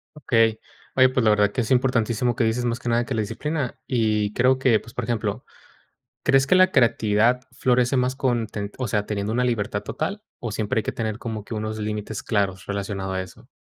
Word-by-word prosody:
Okey. 115 -6 +2 0.4
Oye, 130 0 +7
pues, 130 0 0
la 110 - +5
verdad 105 -1 +3
que - - -1
es 115 - -2
importantísimo 125 -2 +2
lo - - -14
que 125 - +2
dices, 115 +2 0
más 120 0 -1
que 120 - -4
nada, 120 +1 +2
que 135 - -3
la 110 - 0
disciplina. 130 +6 -3
Y 110 -4 +1
creo 130 +1 +3
que, 125 -4 +3
pues, 115 - -14
por 125 - -3
ejemplo, 115 -2 -2 0.8
¿crees 135 0 +4
que 160 - +3
la 185 0 +6
creatividad 115 0 +3
florece 125 +1 +2
más 130 +1 +1
con 120 -4 0
ten, 105 -1 -6
o 130 -3 -2
sea, 105 0 0
teniendo 105 0 -2
una 125 +2 +1
libertad 105 -4 -1
total, 180 - -4 0.2
o 120 - -4
siempre 105 +2 -1
hay - - +1
que - - -3
tener 110 -1 -3
como 110 -4 -5
que 115 - -6
unos 110 0 -3
límites 105 0 -4
claros 100 -4 -1
relacionado 100 -1 -3
a 95 0 -1
eso? 95 - -14
115 Hz, 220 wpm, -24 LUFS, 105-125 Hz, 0.8 s, Oye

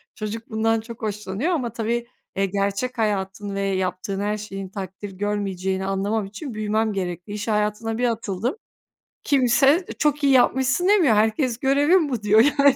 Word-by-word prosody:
çocuk 225 +1 -5
bundan 225 0 +1
çok 230 0 -10
hoşlanıyor 210 - -2
ama 245 -9 -1
tabii, 235 +1 -2 0.3
eee, 195 0 +1
gerçek 200 +6 -2
hayatın 200 -1 -2
ve 200 - -1
yaptığın 190 0 -2
her 210 +1 -1
şeyin 195 -2 -7
takdir 195 0 -7
görmeyeceğini 190 -1 -2
anlamam 200 +2 -1
için 225 +6 -7
büyümem 215 0 0
gerekli. 180 +1 -4
İş 210 +2 -5
hayatına 210 +1 0
bir 245 0 +2
atıldım. 225 - -2 0.7
Kimse 275 +5 +4
çok 295 -1 +1
iyi 275 -1 +5
yapmışsın 265 +7 +3
demiyor. 345 - +5
Herkes 225 +3 +1
görevin 290 +4 +3
bu 235 -5 -3
diyor 210 +1 +5 0.2
yani. 280 -1 +6
215 Hz, 155 wpm, -23 LUFS, 200-250 Hz, 0.7 s, yani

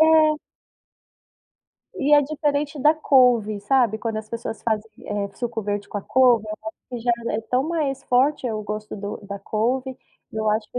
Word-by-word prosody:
É. 315 -1 +6 1.6
E 290 +1 0
é 290 - +6
diferente 290 0 -1
da 300 +3 +5
couve, 245 -9 +3
sabe, 225 -1 +2
quando 225 -1 -3
as 215 0 -5
pessoas 230 -1 -5
fazem, 220 -1 -1
eh, 205 -1 -2
suco 235 -2 -3
verde 205 0 -3
com 205 - -3
a - - -6
couve, 245 -3 +4
eu 215 0 -5
acho - - -11
que 245 -1 -5
já 240 +1 +1 0.2
é 215 - -1
tão 255 +6 0
mais 285 -5 -1
forte 260 0 +2
o 215 -1 -3
gosto 210 +1 -5
do 205 +1 -5
da 200 0 -5
couve. 245 +6 -1 0.4
E - - -8
eu 215 0 0
acho 215 0 +1
que 250 - -3
235 Hz, 190 wpm, -23 LUFS, 215-275 Hz, 1.6 s, É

